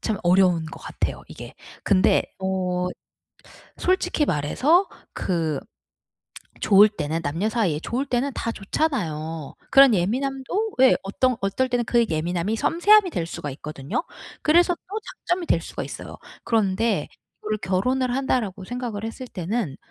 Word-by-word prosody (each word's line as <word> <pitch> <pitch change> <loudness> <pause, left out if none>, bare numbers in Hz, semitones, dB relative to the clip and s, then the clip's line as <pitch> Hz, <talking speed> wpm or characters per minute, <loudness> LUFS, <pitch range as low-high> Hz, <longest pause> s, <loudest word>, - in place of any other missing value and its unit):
참 220 -3 -1
어려운 180 -2 +4
것 155 - -9
같아요 - - -4
이게. - - -10 0.3
근데 190 -2 +4 0.2
어 185 -1 -1 0.9
솔직히 360 -4 +1
말해서 280 - +2 0.2
그 165 -5 -1 1.0
좋을 205 +1 +7
때는 165 -5 -3
남녀 165 +9 -1
사이에 210 -10 0
좋을 255 +9 -2
때는 265 +2 0
다 230 - -2
좋잖아요. 165 - -2 0.2
그런 270 -3 +7
예민함도 270 - -1
예 260 - +7
어떤 245 +5 0
어떨 195 +7 0
때는 245 -1 0
그 235 0 +3
예민함이 175 +6 -1
섬세함이 380 - +4
될 170 - -2
수가 150 -3 -5
있거든요. 140 - -4 0.4
그래서 345 +3 +4
또 410 +5 -7 0.3
장점이 355 -1 0
될 - - +2
수가 - - -6
있어요. - - -8 0.3
그런데 215 -4 +1 0.3
이거를 215 0 -2
'결혼을 245 +7 0
한다.'라고 230 -8 -1
생각을 235 -1 -5
했을 225 +3 -6
때는 185 - -3
215 Hz, 300 characters per minute, -24 LUFS, 180-265 Hz, 1.0 s, 좋을